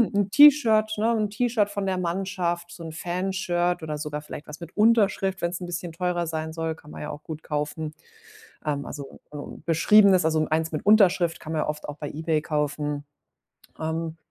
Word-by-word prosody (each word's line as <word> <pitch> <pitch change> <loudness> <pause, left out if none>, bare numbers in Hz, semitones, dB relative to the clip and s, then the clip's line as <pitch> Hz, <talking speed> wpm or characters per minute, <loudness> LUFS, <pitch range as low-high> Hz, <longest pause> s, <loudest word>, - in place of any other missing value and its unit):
'n 200 -1 +2
T-Shirt 235 -6 +6
ne, 220 +2 +2
'n 215 -1 0
T-Shirt 220 -1 +1
von 200 -1 -3
der 190 -1 0
Mannschaft, 175 -1 -2
so 170 - -10
'n 165 - -6
Fan-Shirt, 175 0 -1
oder 155 -1 -3
sogar 150 0 -4
vielleicht 150 0 -9
was 150 - -9
mit 170 -1 -10
Unterschrift, 210 -3 +3
wenn's 170 0 -1
'n - - -4
bisschen 175 0 -4
teurer 175 +1 -1
sein 160 0 -3
soll 165 0 -2
kann 150 -1 -16
man - - -8
ja 150 - -5
auch 145 - -8
gut 160 -1 -7
kaufen. 150 +1 -3 0.7
Ähm, 145 -2 -1
also, 140 -2 -8
äh, 150 - -7 0.3
Beschriebenes, 185 +2 +5
also 155 -1 +2
eins 160 +1 0
mit 155 - -3
Unterschrift 190 -5 +4
kann 160 - -6
man 155 - 0
ja - - -2
oft 150 0 -4
auch 145 - -6
bei 145 -1 -5
eBay 155 0 -1
kaufen. 150 -2 -2 0.8
Ähm. 160 0 -3
170 Hz, 195 wpm, -25 LUFS, 155-195 Hz, 0.8 s, T-Shirt